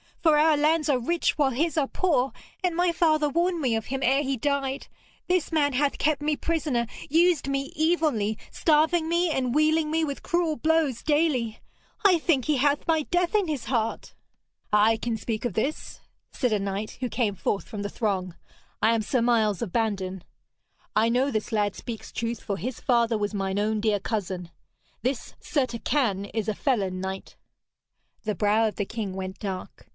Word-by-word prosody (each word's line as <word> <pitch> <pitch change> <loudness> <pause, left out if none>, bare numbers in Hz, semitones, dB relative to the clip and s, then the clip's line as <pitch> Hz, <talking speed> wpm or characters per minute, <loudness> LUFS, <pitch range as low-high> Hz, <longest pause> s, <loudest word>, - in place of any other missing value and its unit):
For 315 -3 +5
our 310 +1 +5
lands 310 +2 +2
are 275 -4 +2
rich 335 +9 0
while 285 -3 +3
his 310 +5 -1
are 285 -3 +2
poor, 275 -8 +1 0.3
and 355 -2 +1
my 350 0 +2
father 310 -3 +2
warned 340 +4 +1
me 255 -6 +1
of 225 -1 -3
him 270 +1 -3
ere 270 +3 +3
he 270 -2 -1
died. 275 +1 -1 0.4
This 360 -3 +1
man 290 -3 +2
hath 280 +2 +1
kept 300 -1 +1
me 300 0 +1
prisoner, 295 -7 -1 0.2
used 330 0 +3
me 275 0 -2
evilly, 300 -10 +1
starving 320 +1 +2
me 345 +1 +2
and 255 -4 0
wealing 310 +1 +3
me 320 +1 +1
with 280 -3 -3
cruel 340 -3 0
blows 315 -6 +1
daily. 290 -8 +1 0.5
I 370 -3 +7
think 295 -6 +1
he 300 -2 +2
hath 285 +2 +1
my 320 -2 +2
death 355 +2 0
in 415 -4 +2
his 290 -7 -3
heart.' 230 -3 -2 0.6
'I 210 +2 +4
can 230 0 -2
speak 220 0 -3
of 240 - -1
this 270 - -2
thing,' - - -30 0.3
said 250 -6 0
a 210 - +2
knight, 200 +2 -4
who 250 -1 -2
came 220 -6 0
forth 200 - -2
from 210 - -6
the 205 - -3
throng. 190 -6 -2 0.5
'I 230 +1 +4
am 225 - +1
Sir 235 +3 0
Miles 225 -4 +2
of 205 - -5
Bandon. 190 -5 -1 0.7
I 220 +2 +4
know 255 +4 +2
this 215 0 -2
lad 205 -2 +1
speaks 230 -3 -7
truth, 230 -1 -3
for 200 - -3
his 250 +4 -4
father 235 -3 +2
was 210 0 -2
mine 195 -1 -2
own 215 +1 0
dear 210 -2 +2
cousin. 190 -4 -3 0.5
This 255 +2 -2
Sir 285 -5 0
Turquine 235 -4 -1
is 215 0 -3
a 215 - 0
felon 195 -9 0
knight.' 190 0 -6 0.9
The 215 -2 -1
brow 210 +4 +3
of 215 - -4
the 205 - -2
king 210 -3 -4
went 190 0 -6
dark. 190 -3 -6
255 Hz, 190 wpm, -26 LUFS, 215-310 Hz, 0.9 s, I